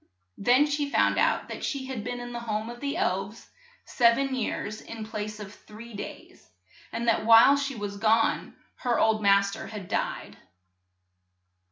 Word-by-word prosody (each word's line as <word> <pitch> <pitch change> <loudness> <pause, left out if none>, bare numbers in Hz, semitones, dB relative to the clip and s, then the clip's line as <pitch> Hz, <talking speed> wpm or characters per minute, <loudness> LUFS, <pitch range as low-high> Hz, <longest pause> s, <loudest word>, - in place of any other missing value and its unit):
Then 250 +7 +4
she 290 -1 -1
found - - +2
out - - +1
that - - -7
she 275 -2 -3
had 260 -5 -5
been 245 0 -4
in 245 0 -7
the 240 - -4
home 220 0 -3
of 240 - -10
the 285 +4 -3
elves 370 - -2 0.4
sev 235 -2 +3
en 270 -1 -1
years 215 -3 -3
in 225 -1 -8
place 215 -1 -5
of 205 -1 -8
three 225 +3 -13
days, 205 - -10 0.4
and 235 +1 -3
that 230 - +2
while 230 +5 +7
she 280 -1 -2
was 205 -2 -5
gone 225 +2 +1 0.2
her 245 -2 0
old 220 -1 +2
mas 200 -1 +4
ter - - -7
had 210 -4 -8
died. - - -3
230 Hz, 175 wpm, -27 LUFS, 215-255 Hz, 0.4 s, while